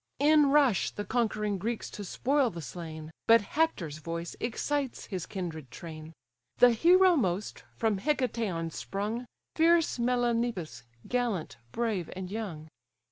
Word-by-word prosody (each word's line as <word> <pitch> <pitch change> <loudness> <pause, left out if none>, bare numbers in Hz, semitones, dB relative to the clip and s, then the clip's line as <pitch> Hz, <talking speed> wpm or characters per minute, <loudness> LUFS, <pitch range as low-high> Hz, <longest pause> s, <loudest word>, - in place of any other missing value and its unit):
In 295 0 +5
rush 275 -9 +4
the 205 - -6
conquering 210 -4 0
Greeks 225 +4 -3
to 205 - -6
spoil 265 +7 +1
the 170 - -8
slain: 160 0 -7 0.2
But 230 0 +7
Hector's 200 - -1
voice 170 +1 -5
excites 275 +3 -2
his 185 -4 -5
kindred 165 -8 -5
train; 155 +4 -9 0.5
The 245 0 +7
hero 360 +9 +5
most, 195 - -1
from 220 -4 0
Hicetaon 225 - -1
sprung, 215 +8 -4 0.3
Fierce 330 -4 +3
Melanippus, 235 -7 0 0.3
gallant, 235 - -1
brave, 215 - -1
and 185 0 -6
young. 190 -8 -5
220 Hz, 130 wpm, -29 LUFS, 175-250 Hz, 0.5 s, But